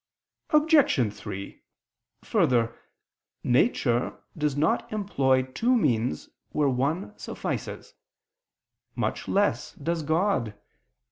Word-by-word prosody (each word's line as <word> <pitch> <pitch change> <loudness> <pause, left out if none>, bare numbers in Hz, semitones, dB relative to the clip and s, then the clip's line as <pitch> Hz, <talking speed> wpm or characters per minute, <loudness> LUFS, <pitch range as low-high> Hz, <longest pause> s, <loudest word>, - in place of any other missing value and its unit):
Obj. 300 - +4
3: 100 -1 -8 0.6
Further, 115 -2 +2 0.7
nature 125 - +2 0.2
does 150 -3 -1
not 155 +3 +1
employ 135 -12 +2
two 225 - +1
means 120 - 0 0.2
where 150 -2 +1
one 145 +11 -1
suffices: - - -5 1.0
much - - -2
less 195 -10 +1
does 165 +3 -2
God. 155 - 0
145 Hz, 85 wpm, -27 LUFS, 120-195 Hz, 1.0 s, Obj